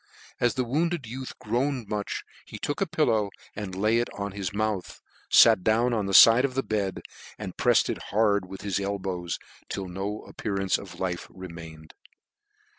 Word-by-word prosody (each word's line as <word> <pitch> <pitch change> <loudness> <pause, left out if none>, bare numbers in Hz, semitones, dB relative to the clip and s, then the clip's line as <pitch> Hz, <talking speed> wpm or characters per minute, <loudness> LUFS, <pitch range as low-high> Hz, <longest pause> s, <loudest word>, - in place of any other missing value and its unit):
As 120 -1 +2
the 130 - +1
wounded 155 +4 0
youth 130 +3 -7
groaned 125 +2 -1
much, 105 -1 -3 0.2
he - - -8
took 145 - -3
the 195 - +1
pillow, 115 -10 +1 0.3
and 100 -3 -5
laying 110 +4 +2
it 120 - -1
on 100 0 -3
his 100 -2 -4
mouth, 105 -2 -2 0.3
fat 110 -3 +8
dowo 115 +4 +3
on 105 -4 0
the 100 - -2
fide 115 +2 +9
of 135 -2 -1
the 135 - +1
bed, 100 -3 -2 0.3
and - - -6
prefTed - - +3
it - - -11
hard 100 -2 +2
with 95 0 -8
his 100 -2 -1
elbow/ 95 -3 -3 0.4
till 95 -2 -4
no 100 +4 -4
appear 105 -3 -5
ance 95 -1 +1
of - - -11
life 90 -2 -3
remained. 85 -4 -10
105 Hz, 180 wpm, -27 LUFS, 95-120 Hz, 0.4 s, fide